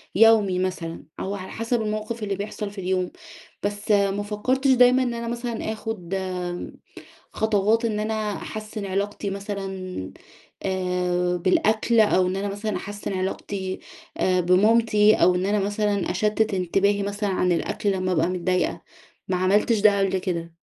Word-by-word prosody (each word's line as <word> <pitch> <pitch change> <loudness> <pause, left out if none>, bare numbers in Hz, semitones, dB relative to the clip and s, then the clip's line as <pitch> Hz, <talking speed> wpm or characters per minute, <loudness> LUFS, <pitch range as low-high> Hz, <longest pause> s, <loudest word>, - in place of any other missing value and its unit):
يومي 210 -4 +5
مثلًا، 180 -3 -3 0.2
أو 200 +1 -3
على 190 -1 -7
حسب 230 +1 -1
الموقف 215 +1 -3
اللي 200 -1 -1
بيحصل 205 +1 -5
في 200 -1 -7
اليوم، 185 0 -1 0.5
بس 205 +1 -2
ما 200 0 +2
فكرتش 255 +6 +1
دايمًا 250 0 +5
إن 245 -2 -1
أنا 235 0 -4
مثلًا 235 -2 -3
آخد 210 -5 -6 1.2
خطوات 220 +2 +2
إن 215 -2 0
أنا 215 -1 -1
أحسّن 215 -1 -6
علاقتي 200 +1 -2
مثلًا 195 - -5 0.5
آآ 180 -1 0
بالأكل، 220 +6 +2
أو 185 -4 +4
إن 185 +1 -1
أنا 200 +1 -2
مثلًا 205 0 -3
أحسّن 205 +2 -5
علاقتي 190 0 -3 0.4
آآ 185 -1 +2
بمامتي، 210 +4 +4
أو 180 - +4
إن 180 +1 0
أنا 210 +1 +2
مثلًا 205 -1 0
أشتت 215 +2 +1
انتباهي 195 +3 +1
مثلًا 205 +1 -2
عن 180 -1 +1
الأكل 200 +4 -1
لما 185 -1 -1
أبقى 165 0 +2
متضايقة، 180 0 -1 0.5
ما 185 - +1
عملتش 205 +4 +2
ده 205 -1 +5
قبل 195 -1 +1
كده. 170 -3 -4
200 Hz, 150 wpm, -24 LUFS, 185-215 Hz, 1.2 s, يومي